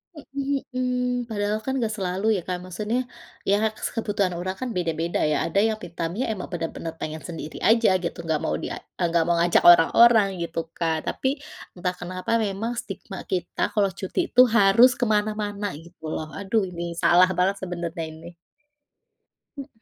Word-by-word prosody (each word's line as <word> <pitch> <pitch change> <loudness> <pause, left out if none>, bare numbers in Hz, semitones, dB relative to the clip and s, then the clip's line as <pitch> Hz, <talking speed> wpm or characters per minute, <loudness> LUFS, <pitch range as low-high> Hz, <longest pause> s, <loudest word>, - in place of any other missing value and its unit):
Mhm 280 -1 -3
mhm, 250 0 -1 0.3
padahal 210 0 -1
kan 265 - -1
gak 220 -1 -1
selalu 190 +2 -2
ya - - -3
Kak 180 -1 -1
maksudnya, 210 +7 -2 0.5
ya 200 - +5 0.4
kebutuhan 205 -5 0
orang 185 +1 -3
kan 255 -1 -3
beda-beda 170 -1 -1
ya 150 - +1
ada 195 +4 +1
yang 220 0 +1
me - - -6
time-nya 175 +10 -2
emang 190 - -6
bener-bener 165 -1 -4
pengen 155 0 -5
sendiri 160 -2 -7
aja 230 -1 +5
gitu 170 - -3
nggak 160 -2 0
mau - - 0
di - - -5
a - - -5 0.3
nggak 170 -1 +3
mau 170 - +3
ngajak 170 +1 +4
orang-orang 210 +6 +7
gitu 170 0 -3 0.2
kan 160 -2 0
tapi 265 - 0 0.5
entah 180 0 -1
kenapa 185 +3 -5
memang 210 +3 -2
stigma 195 -1 -8
kita 180 -2 -1
kalau 200 -2 +2
cuti 190 - -3
itu 250 - +7 0.2
harus 230 +6 +6
kemana-mana 210 -2 0
gitu 165 -1 -11
loh 155 - -4
aduh 200 +1 0
ini 170 -1 -5
salah 180 +2 +5
banget 190 +2 +2
sebenarnya 175 -2 -4
ini. 160 +2 -11 1.3
Mhm. 275 0 -6
190 Hz, 165 wpm, -24 LUFS, 170-220 Hz, 1.3 s, orang-orang